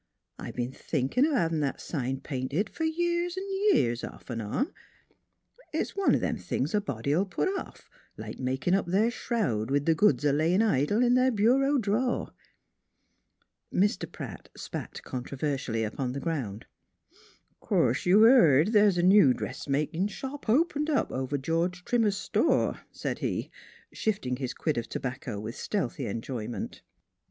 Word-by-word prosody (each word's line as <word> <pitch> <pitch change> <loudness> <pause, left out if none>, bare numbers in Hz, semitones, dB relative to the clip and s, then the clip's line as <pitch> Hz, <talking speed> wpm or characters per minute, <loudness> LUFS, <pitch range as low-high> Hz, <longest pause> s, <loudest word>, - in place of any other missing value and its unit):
I - - -6
b'en 120 +1 -3
thinkin' 150 - 0
o' 310 - 0
havin' 165 -6 +1
that 140 -2 -1
sign 135 -3 -3
painted 140 +9 -2
f'r 320 -1 -1
years 345 +1 0
V 390 +2 0
years, 120 - +2
off - - -8
V 125 - -6
on. 115 - -2 1.0
It's - - -2
one 395 -1 +3
o' - - +3
them - - -1
things - - -2
a 210 - +2
body 140 - -3
'11 185 +6 +1
put 180 - 0
off 385 0 -6 0.3
2 - - -7
NEIGHBORS - - -9
like - - -8
makin' 130 +7 0
up 195 -2 +2
their 205 +6 +2
shroud, 185 - -1
with 140 +1 +1
the 165 - +4
goods 150 -7 +3
a 145 - +4
layin' 165 +8 +3
idle 205 - +2
in 245 0 +4
their 255 +1 +4
bureau 260 +6 +3
draw'." 240 +2 0 1.4
Mr. 200 0 +1
Pratt - - -8
spat - - -7
controversially 130 -2 -3
upon 125 +4 -3
the 140 - -3
ground. 130 -10 -3 0.5
" - - -29
'Course 130 +8 +1
you've 200 +5 +7
heared 190 - +6
th's 205 -3 +5
a 175 - +2
new 185 -9 +6
dressmakin' 155 +6 -2
shop 265 +4 -7
opened 300 +4 +2
up 295 - +1
over 130 +2 -2
George 170 +6 -1
Trimmer's 220 -5 +2
store," - - +1
said - - -4
he, - - -2 0.4
shifting 135 -13 -1
his 130 -2 -4
quid 155 -6 -1
of 115 - -7
tobacco 125 -4 -4
with 110 +4 -6
stealthy 195 - -2
enjoyment. 115 +2 -5
170 Hz, 165 wpm, -28 LUFS, -, 1.4 s, you've